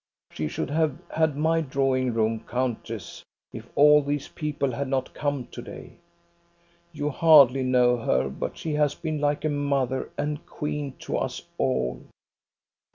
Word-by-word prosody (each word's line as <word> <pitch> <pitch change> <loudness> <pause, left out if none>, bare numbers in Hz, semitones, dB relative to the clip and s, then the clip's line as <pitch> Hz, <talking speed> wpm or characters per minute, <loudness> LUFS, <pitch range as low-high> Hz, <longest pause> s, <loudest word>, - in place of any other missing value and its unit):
She 75 - -3
should 105 - -4
have 155 -3 +1
had 160 -3 +1
my 160 +2 +2
drawing 130 -3 0
room, 110 0 +1
countess, 115 -6 -3 0.3
if - - -9
all 150 +1 +7
these 145 0 -3
people 145 -3 -2
had 140 +3 -3
not 130 -1 -2
come 145 -4 -2
to - - -7
day. - - -11 0.9
You 150 -2 -2
hardly 140 -4 +6
know 125 -1 +3
her, 65 - +1
but 65 - -5
she 160 - -3
has 150 -1 +2
been 155 -3 -3
like 145 +1 0
a - - +2
mother 140 -3 -1
and 150 +1 -2
queen 150 -3 -4
to - - -2
us - - -3 0.2
all. 65 -1 0
140 Hz, 155 wpm, -26 LUFS, 125-150 Hz, 0.9 s, all